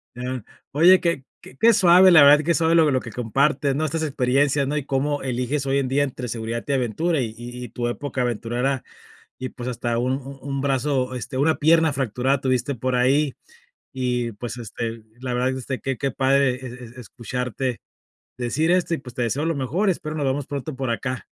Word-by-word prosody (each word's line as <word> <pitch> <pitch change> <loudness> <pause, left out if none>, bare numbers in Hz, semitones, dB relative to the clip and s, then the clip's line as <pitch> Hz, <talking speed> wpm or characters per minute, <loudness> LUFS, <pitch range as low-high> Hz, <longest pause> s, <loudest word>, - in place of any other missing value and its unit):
ya. 125 -1 -4 0.3
Oye, 175 +6 +6
que 170 -6 0 0.4
que 230 0 +6
suave, 185 0 +7
la 155 -4 +8
verdad, 145 +2 +7
que 170 +3 +2
suave 165 0 +2
lo 160 -2 +5
lo 130 - +2
que 115 - -9
compartes, 135 +4 +1
¿no?, 155 +2 0
estas 160 +2 -2
experiencias, 140 0 +1
¿no?, 145 - -2
y 145 -2 -2
cómo 145 +1 -1
eliges 130 +2 -2
hoy 135 0 +1
en 135 -2 0
día 140 +2 +2
entre 125 -2 -4
seguridad 115 0 -4
y 140 - 0
aventura 135 +5 0
y 110 -2 -3
y 120 +1 -8
y 120 - -7
tu 120 +1 -3
época 130 +1 -3
aventurera, 120 +3 -1 0.6
y 130 -1 -5
pues, 125 -1 -7
hasta 120 -1 -2
un 135 +2 -3
un 140 0 -4
brazo, 135 -1 0
este, 125 +1 -6
una 155 +3 +3
pierna 160 0 +4
fracturada 130 +1 0
tuviste 130 +1 0
por 130 +2 -2
ahí, 135 +3 +2 0.6
y 125 -2 -1
pues, 115 +3 -6
este, 115 0 -5 0.2
la 130 -1 -4
verdad 130 +1 0
este, 130 0 -5
que 135 -2 -2
que 140 -1 -1
padre 135 0 +2
e 130 +1 -9
es 120 - -7 0.3
escucharte 125 +1 -4 0.6
decir 130 +7 0
esto, 180 -1 +2
y - - -3
pues, 125 -3 -11
te 125 - -2
deseo 130 +6 -1
lo 165 - 0
mejor 165 - 0
espero 160 -3 -4
nos 145 -3 -1
vemos 135 +1 -1
pronto 145 0 -5
por 130 -2 -2
acá. 125 +3 -3
130 Hz, 200 wpm, -23 LUFS, 125-145 Hz, 0.6 s, la